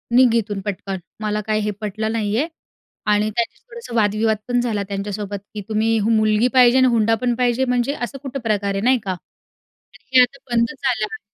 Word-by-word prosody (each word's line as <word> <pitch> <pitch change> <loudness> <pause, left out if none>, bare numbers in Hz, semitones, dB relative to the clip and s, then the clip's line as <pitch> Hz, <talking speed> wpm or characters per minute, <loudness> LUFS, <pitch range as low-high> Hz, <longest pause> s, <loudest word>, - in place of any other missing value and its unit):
निघ 250 -2 +6
इथून 210 -3 -1
पटकन, 195 -1 -3 0.2
मला 210 0 -1
काही 215 0 +1
हे 210 0 -1
पटलं 215 +1 -2
नाही 215 -2 -1
आहे." 295 +6 +1 0.7
आणि 210 +1 +2
त्यांचे 230 +2 -2
थोडंसं 470 - -9
वादविवाद 215 0 +2
पण 245 0 +1
झाला 220 -4 -1
त्यांच्यासोबत, 200 0 -4 0.2
की 210 - -5
तुम्ही 220 +1 +2
मुलगी 215 +1 +3
पाहिजे 250 -1 +6
आणि 260 0 +5
हुंडा 225 -2 +3
पण 245 -1 +1
पाहिजे 250 +1 +1
म्हणजे? 250 +2 0
असं 275 0 -5
कुठं 275 0 -4
प्रकार 205 -4 -1
आहे? 195 - -2
नाही 255 +1 +4
का? 190 -3 -2 1.0
हे 260 - +7
आता 250 +3 -1
बंद 235 0 +2
झालं 250 -6 0
आहे. - - -6
225 Hz, 190 wpm, -21 LUFS, 210-245 Hz, 1.0 s, हे